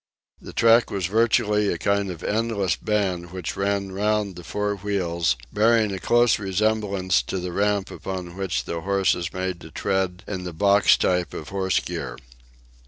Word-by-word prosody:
The - - -9
track 115 +1 +4
was 95 -3 -2
virtually 105 0 +2
a 85 - -2
kind 100 +2 0
of 90 -2 -7
endless 105 -4 0
band 95 -5 -1
which 90 -3 -5
ran 100 0 -1
round 105 0 0
the 85 - -9
four 105 +3 -2
wheels, 85 -7 0 0.2
bearing 110 0 +3
a 95 - -4
close 120 +2 +3
resemblance 100 -2 +1
to - - -4
the 90 0 -4
ramp 100 +1 0
upon 90 -2 -6
which 95 -2 -2
the 85 - -4
horse 100 +1 +2
is 85 0 -4
made 95 -2 -3
to - - -10
tread 95 -1 -1
in 95 -3 -4
the 90 -1 -6
"box" 100 +4 +4
type 90 -2 0
of 75 - -7
horse 95 -1 +1
gear. - - -5
95 Hz, 170 wpm, -24 LUFS, 90-105 Hz, 0.2 s, track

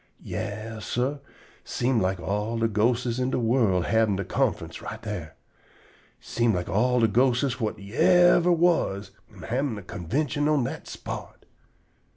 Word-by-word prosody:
Yas, 110 0 -5
sah, 130 +4 -1 0.5
seem 125 -1 0
like 95 0 0
all 105 +6 -2
de 115 0 +2
ghostes 115 +3 +1
in 125 0 0
de - - -1
world 115 -7 +2
havin' 110 -3 +2
de 95 0 -3
conferince - - -1
right - - -7
dar. 90 -8 -6 0.8
Seem 115 -3 0
like 90 -1 -3
all 125 +4 +2
de 115 - +5
ghosteses 125 +3 +2
whut 110 -2 -2
yever 175 - +4
was 160 - +1 0.2
am 100 -4 -13
havin' 125 0 -1
a 100 - -8
convintion 140 - -2
on 150 -4 +2
dat - - -5
spot. - - -8
115 Hz, 150 wpm, -26 LUFS, 105-130 Hz, 0.8 s, de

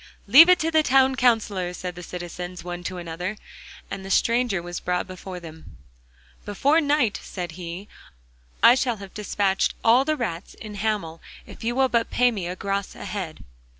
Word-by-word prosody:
'Leave 325 +6 +9
it 365 - +7
to 325 0 -1
the 315 -1 +4
Town 265 -2 +4
Counsellor,' 210 -8 +1
said 180 0 -5
the 180 - -9
citizens 175 0 -7
one 175 0 -6
to 185 - -4
another. 175 +4 -5 0.5
And 190 - -5
the 195 - -8
stranger 235 -1 +2
was 175 0 -6
brought 180 0 -1
before 185 0 -8
them. 160 - -12 0.7
'Before 280 +10 +2
night,' 285 -7 +1
said 175 -3 -6
he, 175 +3 -7 0.8
'I 235 - +9
shall 245 -3 0
have 195 -1 -11
despatched 200 -2 0
all 235 +3 +5
the 310 +2 -1
rats 175 -8 -4
in 215 -2 -9
Hamel 205 -6 -2 0.2
if - - -12
you 235 +1 -1
will 265 0 +3
but 235 -2 0
pay 250 0 +3
me 195 -6 -4
a 180 - -4
gros 195 +1 -3
a - - -8
head. 185 -7 -5
200 Hz, 185 wpm, -24 LUFS, 180-245 Hz, 0.8 s, Leave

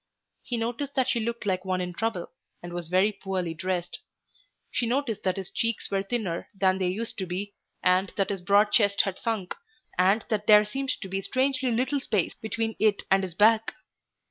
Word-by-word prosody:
He 245 - -3
noticed 240 +5 -3
that 260 -2 +2
she 235 - +1
looked 235 0 -3
like 185 -2 0
one 185 -1 -1
in 180 -1 -3
trouble, 220 -3 -2 0.3
and 175 0 -7
was 175 -2 -3
very 190 +4 +4
poorly 190 -4 -3
dressed. 175 +1 -3 0.7
She 240 - 0
noticed 240 -4 -1
that 185 0 0
his 190 -1 -5
cheeks 230 -1 -1
were 195 -1 +1
thinner 195 -5 -3
than 190 -1 +3
they 185 - +1
used 215 +5 -3
to 190 - -2
be, 195 +3 -4 0.3
and 185 +1 +3
that 195 0 +1
his 195 -2 -3
broad 205 +3 +4
chest 205 -3 +4
had 195 -2 -4
sunk, 215 -6 -2 0.5
and 195 +4 +4
that 210 -1 -1
there 210 0 +8
seemed 270 +6 -4
to 195 - -5
be 195 +1 -2
strangely 260 +4 0
little 255 +5 +1
space 210 -9 0
between 225 0 -3
it 215 -2 +2
and 195 0 +5
his 185 -3 -5
back. 220 +2 +4
205 Hz, 195 wpm, -27 LUFS, 185-230 Hz, 0.7 s, there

